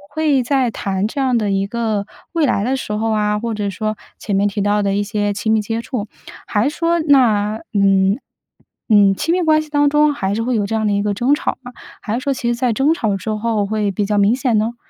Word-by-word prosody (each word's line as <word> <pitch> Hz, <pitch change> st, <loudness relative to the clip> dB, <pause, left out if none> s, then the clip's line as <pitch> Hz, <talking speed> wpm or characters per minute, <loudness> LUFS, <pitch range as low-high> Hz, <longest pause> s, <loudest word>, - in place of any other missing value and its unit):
会 295 Hz, -5 st, +2 dB
在 260 Hz, -1 st, +1 dB
谈 195 Hz, 0 st, -2 dB
这 255 Hz, -, -5 dB
样 255 Hz, -3 st, +2 dB
的 210 Hz, -2 st, -1 dB
一 195 Hz, 0 st, 0 dB
个 220 Hz, -2 st, -2 dB, 0.3 s
未 325 Hz, -3 st, +2 dB
来 200 Hz, -6 st, +1 dB
的 260 Hz, +4 st, 0 dB
时 210 Hz, -, -5 dB
候 220 Hz, +1 st, -1 dB
啊， 210 Hz, -1 st, 0 dB
或 230 Hz, 0 st, -3 dB
者 205 Hz, -1 st, -2 dB
说 215 Hz, +3 st, -3 dB, 0.2 s
前 205 Hz, -, -2 dB
面 200 Hz, +1 st, +2 dB
提 205 Hz, 0 st, -2 dB
到 205 Hz, 0 st, +1 dB
的 195 Hz, 0 st, 0 dB
一 205 Hz, -, +1 dB
些 205 Hz, 0 st, -1 dB
亲 210 Hz, +2 st, -2 dB
密 220 Hz, -, +3 dB
接 225 Hz, +2 st, -3 dB
触， 230 Hz, -3 st, -4 dB, 0.4 s
还 215 Hz, +6 st, +1 dB
是 300 Hz, -, -10 dB
说 335 Hz, 0 st, +1 dB
那 225 Hz, -8 st, +3 dB
嗯， 195 Hz, +1 st, +3 dB, 0.7 s
嗯， 200 Hz, -2 st, +5 dB
亲 325 Hz, -, -1 dB
密 365 Hz, -, +1 dB
关 310 Hz, -2 st, +3 dB
系 310 Hz, -, -10 dB
当 290 Hz, -1 st, +3 dB
中 295 Hz, 0 st, +3 dB
还 195 Hz, -7 st, -2 dB
是 225 Hz, -, -1 dB
会 250 Hz, 0 st, -1 dB
有 205 Hz, -2 st, 0 dB
这 225 Hz, -, -2 dB
样 220 Hz, -1 st, 0 dB
的 205 Hz, -, +1 dB
一 200 Hz, -, +1 dB
个 210 Hz, -, 0 dB
争 245 Hz, +8 st, +1 dB
吵 -, -, -3 dB
嘛， 245 Hz, -1 st, -10 dB, 0.3 s
还 215 Hz, -, -4 dB
是 -, -, -1 dB
说 275 Hz, 0 st, 0 dB
其 250 Hz, -2 st, -4 dB
实 240 Hz, -, +1 dB
在 245 Hz, -1 st, 0 dB
争 275 Hz, +7 st, +2 dB
吵 210 Hz, -10 st, -1 dB
之 215 Hz, +3 st, -4 dB
后 215 Hz, -1 st, -1 dB
会 210 Hz, -1 st, -1 dB
比 200 Hz, +2 st, -1 dB
较 210 Hz, 0 st, 0 dB
明 205 Hz, +3 st, +4 dB
显 250 Hz, -4 st, +1 dB
呢？ 225 Hz, +3 st, -1 dB
220 Hz, 275 characters per minute, -18 LUFS, 205-260 Hz, 0.7 s, 嗯